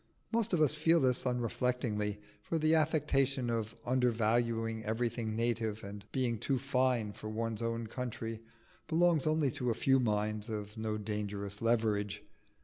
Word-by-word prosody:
Most 230 -1 +1
of 175 -4 +2
us 150 -2 +4
feel 160 +2 +4
this 130 -2 +2
unreflectingly; 120 -4 -1 0.2
for 165 +10 -2
the 155 0 +3
affectation 140 -5 +2
of 115 -1 -2
undervaluing 115 -2 +1
everything 110 0 -1
native, 115 -2 -1
and 100 0 -8
being 120 -4 0
too 135 +3 0
fine 125 -5 +1
for 110 - -7
one's 115 0 -2
own 115 0 -1
country, 115 -1 -5 0.5
belongs 165 -2 +3
only 155 -3 +2
to 125 +1 -2
a 115 - +1
few 135 0 +3
minds 105 -2 0
of 105 -1 -5
no 110 -1 -2
dangerous 100 -1 -4
leverage. 105 -3 +1
115 Hz, 145 wpm, -33 LUFS, 110-130 Hz, 0.5 s, us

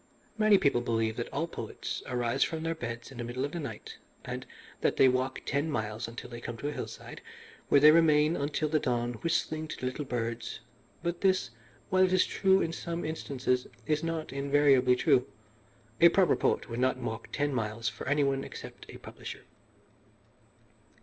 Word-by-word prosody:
"Many 215 -2 +5
people 140 -8 +2
believe 115 -2 0
that 120 - -4
all 155 +4 -1
poets 170 - -5
arise 125 +1 +1
from 160 -1 -3
their 165 0 0
beds 115 -5 -6
in 130 - -10
the - - -2
middle 125 +3 -2
of 145 - -5
the 170 - -4
night, 145 - -7 0.3
and - - -5 0.3
that - - +1
they 135 - +7
walk 130 +1 0
ten 145 +3 0
miles 110 -3 -3
until 115 +1 -8
they 120 0 -9
come 120 -1 -6
to 145 - -3
a - - -3
hillside, - - -7 0.5
where 140 - +6
they 150 +2 +9
remain 155 -1 +4
until 150 +1 -1
the 155 0 +2
dawn 120 -2 -1
whistling 155 -1 -1
to - - -6
the - - -5
little 130 +4 -2
birds; 115 -3 -3 0.4
but 175 0 -2
this, 185 -10 +2 0.4
while 185 0 +5
it 185 0 +3
is 185 - +4
true 190 0 +3
in 165 - -2
some 170 0 -4
instances, 130 -5 -1 0.2
is 155 0 0
not 165 -2 -3
invariably 140 -2 +4
true. 125 0 +3 0.7
A 170 - +9
proper 185 +1 +4
poet - - 0
would 115 0 -5
not 130 +1 +2
walk 115 -2 -5
ten 145 -1 0
miles 115 -1 -2
for 110 +3 -4
any 145 +1 +3
one 135 -1 0
except - - -9
a - - -9
publisher. - - -9
140 Hz, 190 wpm, -30 LUFS, 120-160 Hz, 0.7 s, they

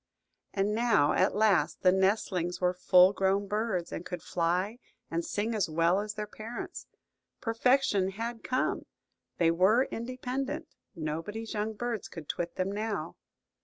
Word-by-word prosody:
And 200 +1 0
now 220 -10 +3
at - - +2
last 210 -3 +2
the 185 - +7
nestlings 190 -2 +1
were 180 0 +2
full 180 +1 +6
grown 195 +1 +1
birds, 205 -4 -1
and - - -5
could 180 -1 -6
fly 180 +7 0 0.3
and 165 +1 -1
sing 215 +6 -2
as 210 -6 0
well 165 +4 +3
as 210 0 -4
their 210 -1 -3
parents. 220 +3 -7 0.5
Perfection 225 -4 +2
had 230 +3 -5
come; 255 0 -1 0.5
they 165 -1 +4
were 190 +9 +4
independent; 255 +6 -4 0.3
nobody's 165 +8 -4
young 215 +1 -1
birds 235 -1 -3
could 165 -4 -9
twit 175 0 -3
them 185 +1 -1
now. 215 +1 -3
205 Hz, 145 wpm, -30 LUFS, 180-225 Hz, 0.5 s, the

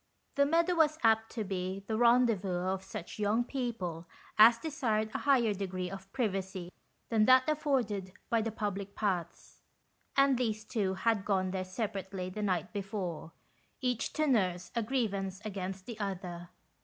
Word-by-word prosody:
The 280 0 +3
meadow 335 +3 +3
was 310 -2 +3
apt 225 0 +3
to 225 - -2
be 190 0 -3
the 220 - -2
rendezvous 225 -6 +3
of 190 0 -1
such 190 0 -7
young 210 +3 +2
people 225 - -4 0.3
as 225 +2 +8
desired 230 -8 -1
a - - -1
higher 250 -7 +3
degree 185 -2 -3
of 195 0 -9
privacy 190 -7 -2 0.4
than 220 -2 +4
that 255 +1 +6
afforded 255 -11 0 0.2
by 230 -1 +2
the 225 +1 -2
public 200 -2 -4
paths; 180 -5 -3 0.6
and 275 -2 +5
these 220 -3 -1
two 200 -5 -1
had 215 +1 +1
gone 190 -2 +1
there 190 -1 -2
separately 190 -2 -4
the 210 - -5
night 185 -3 -1
before, 190 -5 -4 0.5
each 250 -3 -1
to 310 - +1
nurse 185 -9 +1
a 235 - +2
grievance 200 -6 -1
against 190 -2 -4
the 230 -3 -7
other. 180 -3 -4
210 Hz, 155 wpm, -32 LUFS, 190-235 Hz, 0.6 s, as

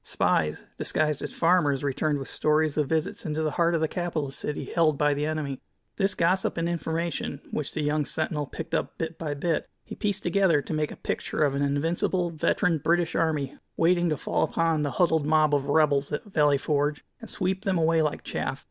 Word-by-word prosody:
Spies, 75 0 0
disguised 150 -2 0
as - - -4
farmers, 165 -6 +2
returned 145 +2 0
with 135 - -6
stories 155 0 +1
of 150 -3 0
visits 160 -1 -1
into 155 0 -2
the 155 - 0
heart 170 +1 +2
of 160 - 0
the 160 - +2
capital 165 -5 -3
city 145 +2 -4
held 160 -4 +2
by 150 0 +3
the 145 +1 -1
enemy. 150 -4 -3 0.4
This 195 -1 +1
gossip 185 +3 +1
and 165 0 0
information, 165 -4 -2
Which 150 - -3
the 155 - -2
young 150 0 +1
sentinel 155 -2 -2
picked 165 +3 -7
up - - -1
bit 160 0 -4
by 150 -3 -3
bit, 165 +3 -1
he - - -9
pieced 205 -1 -2
together 190 -6 +3
to 145 - -5
make 155 -1 0
a - - -7
picture - - -2
of 140 -2 +2
an 140 - -1
invincible, 165 +5 0
veteran 165 +1 +1
British 170 +3 +1
army, 150 -5 -1 0.2
waiting 175 +1 +3
to 155 - 0
fall - - -1
upon 165 -2 +1
the 145 - 0
huddled 160 -4 +2
mob 155 -1 +4
of 140 -1 +1
"rebels" 145 -2 +2
at 150 - -3
Valley 150 -8 +3
Forge, 145 +1 -1
and 225 - -10
sweep 190 0 -2
them 190 -2 +1
away 165 0 +3
like 150 -1 -1
chaff. - - -3
155 Hz, 205 wpm, -26 LUFS, 145-170 Hz, 0.4 s, mob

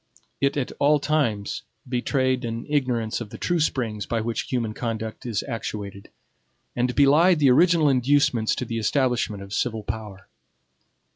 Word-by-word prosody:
It 140 +1 +1
at 135 - -2
all 145 +1 +4
times 135 -9 -1 0.3
betrayed 130 +1 0
an 115 0 -4
ignorance 125 -7 0
of 110 - -6
the 110 - -9
true 175 +6 0
springs 115 -9 -1
by 115 - -1
which 115 +1 -3
human 115 -4 -1
conduct 110 +1 -4
is 110 -3 -1
actuated, 100 -3 -6 0.7
and 125 0 0
belied 155 +6 +5
the 140 -4 +4
original 165 +2 +4
inducements 130 -3 +2
to 125 - -3
the 115 -1 -3
establishment 115 -4 0
of 100 0 -10
civil 110 -1 -1
power. 105 -3 -7
120 Hz, 150 wpm, -24 LUFS, 110-140 Hz, 0.7 s, belied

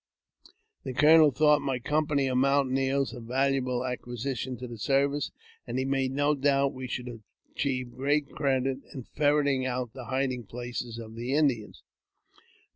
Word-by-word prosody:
The 130 - -5
colonel 155 +2 +7
thought 150 +2 +4
my 135 -2 -1
company 150 +2 0
of 130 -1 +1
mountaineers 135 0 +1
a 125 - -7
valuable 130 +1 0
acquisition 125 +1 -4
to 125 +2 -7
the 120 -2 -9
service, 140 +4 +1 0.4
and - - -3
he 130 - 0
made 135 -1 0
no 145 +2 +2
doubt 140 -1 +2
we 130 0 -6
should 125 -2 -6 0.3
achieve 130 -3 -2
great 145 +3 0
credit 135 -2 0 0.2
in 130 - -6
ferreting 145 -1 +1
out 125 -2 -3
the 130 -2 -8
hiding 130 -2 -2
places 120 0 -5
of 110 -1 -8
the 120 +4 -2
Indians. 130 -8 0
130 Hz, 150 wpm, -28 LUFS, 125-140 Hz, 0.4 s, colonel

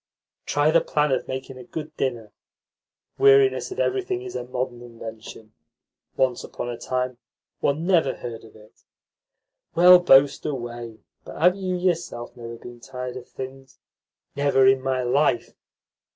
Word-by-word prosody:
Try 145 +1 +2
the 165 - +4
plan 150 -1 0
of 130 - 0
making 130 0 -6
a - - -9
good 155 +4 -7
dinner. 120 -7 -3 0.9
Weariness 415 -1 +5
of 380 - -7
everything 380 -1 -1
is 375 - -8
a - - -3
modern 125 -1 -4
invention. 115 -2 -10 0.6
Once 130 -2 +1
upon 120 - -6
a 120 - -5
time 125 0 -2 0.4
one 150 +4 0
never 170 -8 +3
heard 115 -2 -7
of 115 - -16
it." 110 0 -19 0.9
"Well, 180 +1 +8
boast 140 -5 +5
away, 120 -5 -6 0.2
but - - -10
have 180 +3 +5
you 185 -2 -2
yourself 175 -9 -2
never 115 -1 -8
been 120 +1 -11
tired 125 0 -7
of 125 -1 -9
things?" 135 0 -9 0.6
"Never 140 -2 +3
in 130 0 +5
my 130 -1 -1
life. 125 -1 +1
130 Hz, 150 wpm, -24 LUFS, 120-160 Hz, 0.9 s, Well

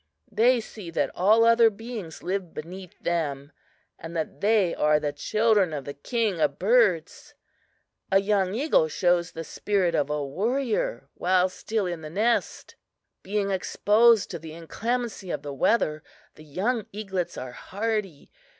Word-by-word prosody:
They 235 +4 +4
see 210 -5 -10
that 165 - -1
all 215 +5 +4
other 230 0 +6
beings 215 -5 -8
live 185 -2 -3
beneath 180 +3 -9
them, 145 -4 -2 0.5
and 165 +1 -6
that 160 - -4
they 205 -4 +3
are 150 0 +3
the 145 -1 -2
children 210 +2 +2
of 140 -3 -5
the 140 - -5
King 210 - -1
of 145 -2 +1
Birds. 200 -6 +1 0.8
A 195 - +6
young 195 -1 +1
eagle 265 - +2
shows 175 +1 +1
the 165 - -6
spirit 185 0 0
of 150 -3 +1
a 150 -1 -1
warrior 215 - -1
while 185 +1 +2
still 215 +2 -3
in 175 -2 -4
the 155 - -7
nest. 220 +8 -1 0.5
"Being 200 0 -1
exposed 210 +3 +3
to 170 - -5
the 160 0 -9
inclemency 220 +5 -3
of - - -3
the 145 -1 -5
weather 155 - +1 0.3
the 155 - -15
young 205 - -2
eaglets 190 -4 -4
are 130 -1 -6
hardy. 200 - -4
190 Hz, 150 wpm, -26 LUFS, 160-220 Hz, 0.8 s, other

